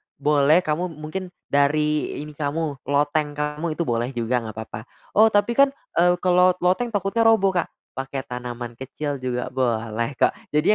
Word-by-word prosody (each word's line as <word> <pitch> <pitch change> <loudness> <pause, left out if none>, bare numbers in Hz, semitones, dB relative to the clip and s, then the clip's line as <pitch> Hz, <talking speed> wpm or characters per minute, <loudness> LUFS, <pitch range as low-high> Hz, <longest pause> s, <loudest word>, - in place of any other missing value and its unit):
Boleh 150 +3 +3
kamu 165 +3 -1
mungkin 155 +5 -5 0.2
dari 150 +2 +2
ini 150 - -9
kamu, 150 -1 -3
loteng 145 +1 +1
kamu 150 +2 -2
itu 170 - -1
boleh 120 -1 -1
juga 120 +1 0
nggak 110 - -7
papa, 110 +1 -7 0.2
"Oh, 220 +2 +6
tapi 205 +1 +2
kan, 275 0 +5 0.3
eee, 175 +1 +5
kalau 180 0 +5
loteng 185 +7 +2
takutnya 205 +3 +1
roboh 220 -4 +5
Kak." 175 -2 0 0.3
Pakai 135 0 -4
tanaman 120 -1 -6
kecil 140 +3 -4
juga 125 -1 -2
boleh 115 -1 -1
kok. - - +4 0.2
Jadi 150 +2 +1
150 Hz, 160 wpm, -23 LUFS, 130-175 Hz, 0.3 s, Oh